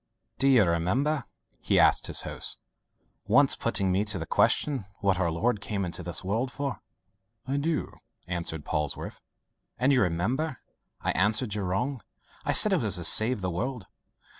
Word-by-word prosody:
"Do 135 - +2
you 130 -5 +5
remember," 115 - 0 0.3
he - - 0
asked - - +3
of - - -5
his - - +7
host, - - -3 0.7
"once - - +4
putting 95 -1 -1
to 95 - +1
me - - +1
the 95 -6 -3
question 135 - +1
what 95 -2 0
our 85 -3 +1
Lord 105 +6 -1
came 100 -2 -3
into 85 - -5
this 85 +1 -2
world 115 +7 -2
for?" 140 -1 -5 0.7
"I 135 +2 -1
do," 155 +2 -2 0.3
answered 85 -4 -4
Polwarth. 75 -3 -4 0.6
"And 130 +4 +2
you 130 - +3
remember 115 - -1 0.4
I - - -1
answered 105 +4 +1
you 105 - -3
wrong: 110 +8 -2 0.4
I - - -1
said 215 - +8
it - - +3
was 105 -5 0
to 90 - -4
save 110 +6 +4
the 90 -1 -2
world." 115 +4 -4
105 Hz, 170 wpm, -27 LUFS, 90-130 Hz, 0.7 s, said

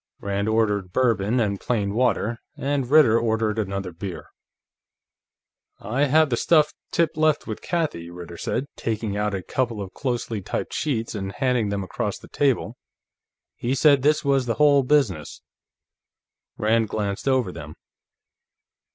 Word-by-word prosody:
Rand 100 +1 -2
ordered 105 -4 +1
Bourbon 115 0 +1
and 100 -4 0
plain 100 -5 -1
water, 115 -1 +1 0.2
and 140 -2 -1
Ritter 135 -7 +6
ordered 110 -1 0
another 100 -3 -3
beer. 90 +2 -7 1.5
"I 135 +6 0
have 155 +1 +3
the 120 - +1
stuff 155 +1 +3 0.2
Tip 165 -2 +1
left 155 -1 +2
with 110 - -6
Kathie," 155 - -2
Ritter 85 -1 -9
said, 130 - -2
taking 110 -2 -3
out 105 0 -1
a 95 - -4
couple 120 -1 -2
of 95 -2 -6
closely 120 -5 -3
typed - - -4
sheets 120 -7 -2
and 95 -2 -4
handing 125 -5 0
them 100 -1 -2
across 95 - -3
the - - -14
table. 125 -5 0 0.8
"He 125 +3 -1
said 140 0 +5
this 150 +2 +2
was 135 -2 +2
the 115 - 0
whole 145 +1 +5
business." 125 - 0 1.1
Rand 110 0 +2
glanced 100 +2 -3
over 130 -8 +2
them. 75 -3 -9
115 Hz, 145 wpm, -24 LUFS, 100-135 Hz, 1.5 s, Ritter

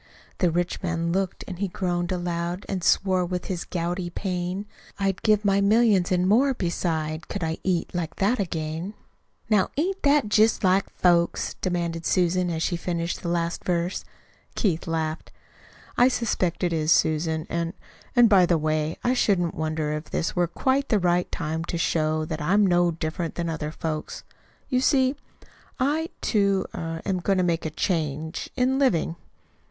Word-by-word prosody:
The 180 - +3
rich 175 +1 -1
man 170 -2 -1
looked, 190 +1 -1
an' 180 - -6
he 200 +2 -1
groaned 175 -1 -2
aloud, 175 0 -2
An' 190 -2 -2
swore 185 +1 +3
with 180 0 -3
his 180 -3 -3
gouty 175 +1 -2
pain. 180 +1 -3 0.3
"I'd 195 -1 -1
give 215 -1 +3
my 200 0 +3
millions, 205 -3 +4
an' 180 0 +2
more 260 +7 +4
beside, 165 -4 -2
Could 200 - -4
I 160 0 -2
eat 180 -3 -1
like 175 -3 -3
that 210 +5 +1
again!" 165 +1 -3 0.5
"Now, 210 -4 +3
ain't 380 +6 0
that 285 -4 +3
jest 215 +1 +3
like 190 +1 +3
folks?" 170 -1 +2
Susan - - -11
demanded, 170 -2 -2 0.5
as 160 - -2
she 175 - 0
finished 170 0 -3
the 170 - -3
last 170 0 -1
verse. 175 0 -1 0.5
Keith 175 -8 0
laughed. 160 -1 -2 0.7
"I 245 - +7
suspect 200 -9 -1
it 175 -1 +1
is, 155 0 +1
Susan. 160 0 +2
And 170 0 -2 0.4
and, 240 -1 +7
by 190 -4 +5
the 170 - +3
way, 155 0 -1
I 245 - +2
shouldn't 190 -9 +2
wonder 155 -1 -2
if 150 +1 -4
this - - -2
were 175 -1 +2
quite 265 - 0
the 215 - +4
right 180 -1 +1
time 160 0 -3
to 170 - -3
show 155 -1 0
that 155 -1 -4
I'm 200 +7 +3
no 175 -1 +3
different 165 0 -3
from 170 -1 -2
other 160 -2 -3
folks. 155 -1 -4 0.4
You 255 -2 +1
see, 265 0 +3 0.6
I, 305 +5 +1
too, 200 -3 +2
er 165 0 -5
am 190 -2 0
going 195 +2 +1
to 185 - +2
make 170 -2 0
a - - -3
change 160 -2 -2
in 260 +2 +2
living." 175 - +2
175 Hz, 170 wpm, -25 LUFS, 165-200 Hz, 0.7 s, I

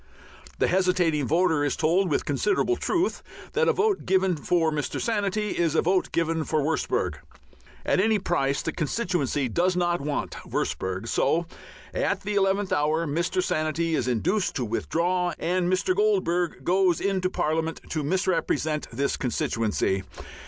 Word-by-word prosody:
The - - +2
hesitating 180 -6 +2
voter 165 -1 +2
is 145 - 0
told, 175 +4 +2
with 145 - 0
considerable 200 - +1
truth, 360 0 -1 0.3
that 470 +1 +2
a - - +5
vote 420 -2 +1
given 190 -1 +2
for 160 +2 +1
Mr. 150 -2 -2
Sanity 210 -2 -1
is 165 -2 +1
a - - +3
vote 185 +2 +1
given 165 -1 0
for 155 0 0
Wurstberg. 155 +2 -1 0.7
At - - +2
any 215 +2 +3
price 140 -8 0
the - - -1
constituency 155 - -1
does 175 +9 +1
not 175 -2 +1
want 145 0 -2
Wurstberg. 95 +4 -3
So 170 +8 +1 0.5
at - - 0
the 210 +1 -3
eleventh 195 0 +1
hour 155 +3 +1
Mr. 170 - 0
Sanity 160 - -1
is 130 -5 0
induced 180 - 0
to 125 - -1
withdraw, 175 +10 0
and 175 +1 0
Mr. 185 - +1
Goldbug 370 - +1
goes 180 -1 +2
into 190 -2 0
Parliament 160 -1 -1
to 155 - -1
misrepresent 160 -2 0
this 140 +4 -1
constituency. 110 -5 0
170 Hz, 150 wpm, -26 LUFS, 150-190 Hz, 0.7 s, a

